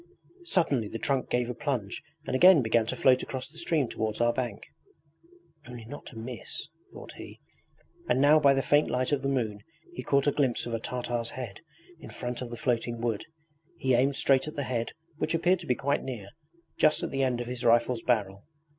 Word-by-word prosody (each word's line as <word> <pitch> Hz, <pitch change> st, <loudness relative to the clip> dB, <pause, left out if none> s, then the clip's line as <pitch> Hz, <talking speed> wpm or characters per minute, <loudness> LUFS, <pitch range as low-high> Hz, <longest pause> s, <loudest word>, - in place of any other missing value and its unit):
Suddenly 145 Hz, -, +1 dB
the 115 Hz, -, -5 dB
trunk 135 Hz, +2 st, -1 dB
gave 120 Hz, -1 st, +1 dB
a 125 Hz, -, -3 dB
plunge 120 Hz, -6 st, -3 dB, 0.2 s
and -, -, -2 dB
again 175 Hz, 0 st, +7 dB
began 110 Hz, 0 st, +2 dB
to -, -, -2 dB
float 130 Hz, -1 st, +4 dB
across 130 Hz, -1 st, -5 dB
the 160 Hz, +3 st, -9 dB
stream 160 Hz, -5 st, +1 dB
towards 110 Hz, -1 st, -3 dB
our 120 Hz, 0 st, +3 dB
bank. 120 Hz, -4 st, -3 dB, 1.0 s
'Only 120 Hz, -2 st, -9 dB
not 145 Hz, +6 st, -9 dB
to 115 Hz, -, -10 dB
miss 115 Hz, 0 st, -6 dB
...' -, -, -34 dB
thought -, -, -10 dB
he, -, -, -10 dB, 0.7 s
and 125 Hz, -, +3 dB
now 145 Hz, +3 st, +6 dB
by 140 Hz, -2 st, +5 dB
the 135 Hz, -, +1 dB
faint 145 Hz, +1 st, +3 dB
light 130 Hz, +2 st, 0 dB
of 145 Hz, -2 st, +1 dB
the 135 Hz, -, -1 dB
moon 115 Hz, -6 st, -1 dB, 0.3 s
he -, -, -5 dB
caught 140 Hz, -1 st, +2 dB
a 145 Hz, -, +4 dB
glimpse 135 Hz, -5 st, 0 dB
of 120 Hz, -, -5 dB
a 115 Hz, -, -1 dB
Tartar's 120 Hz, -1 st, -3 dB
head 120 Hz, -7 st, -7 dB, 0.4 s
in -, -, -10 dB
front 125 Hz, 0 st, -5 dB
of 125 Hz, -, -5 dB
the 120 Hz, -, -7 dB
floating 120 Hz, -1 st, -1 dB
wood. 115 Hz, -3 st, -2 dB, 0.5 s
He 130 Hz, -5 st, +1 dB
aimed 135 Hz, +3 st, +3 dB
straight 135 Hz, +1 st, +3 dB
at 155 Hz, -, -6 dB
the 145 Hz, -, -2 dB
head 120 Hz, -3 st, -2 dB, 0.2 s
which 160 Hz, +1 st, 0 dB
appeared 180 Hz, +2 st, +3 dB
to -, -, -10 dB
be 125 Hz, -, +2 dB
quite 140 Hz, +3 st, 0 dB
near 110 Hz, -7 st, -6 dB, 0.5 s
just 155 Hz, 0 st, +4 dB
at -, -, -3 dB
the 135 Hz, -, -1 dB
end 130 Hz, -2 st, +1 dB
of 120 Hz, -, -3 dB
his 125 Hz, +1 st, -5 dB
rifle's 120 Hz, 0 st, +3 dB
barrel. 100 Hz, -5 st, 0 dB
125 Hz, 215 wpm, -28 LUFS, 115-140 Hz, 1.0 s, again